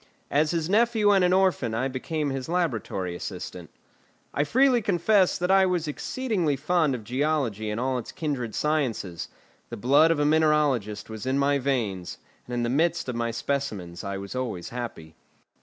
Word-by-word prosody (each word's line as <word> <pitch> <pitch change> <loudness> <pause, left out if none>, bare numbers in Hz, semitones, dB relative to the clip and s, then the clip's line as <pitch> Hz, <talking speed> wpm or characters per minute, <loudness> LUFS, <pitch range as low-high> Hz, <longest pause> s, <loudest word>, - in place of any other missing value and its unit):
As 150 +2 +3
his 165 -1 -1
nephew 215 +1 +3
and 195 -2 +4
an 180 - +3
orphan, 185 -12 +2
I 130 +4 0
became 145 +3 -3
his 135 +2 -4
laboratory 110 - -1
assistant. - - -7 0.6
I 145 - +1
freely 255 - +4
confess 195 0 +3
that 180 +1 0
I 190 -1 +5
was 175 -3 -1
exceedingly 180 - -1
fond 155 0 +1
of 115 - -7
geology 125 -4 -1
and 105 +2 -2
all 130 0 0
its 115 - -8
kindred 135 -8 -3
sciences; 125 - -1 0.4
the - - -6
blood 140 +8 +5
of 165 - +2
a 145 - +2
mineralogist 150 -9 +2
was 110 +2 -6
in 130 +1 +1
my 140 0 +2
veins, 115 -10 -2 0.3
and 125 - -4
in 120 - 0
the - - 0
midst 150 +2 +1
of 125 - -3
my 115 0 -1
specimens 115 -8 -3
I 100 -1 -3
was 100 0 -7
always 120 -9 -4
happy. 115 -10 -6
140 Hz, 175 wpm, -26 LUFS, 115-165 Hz, 0.6 s, I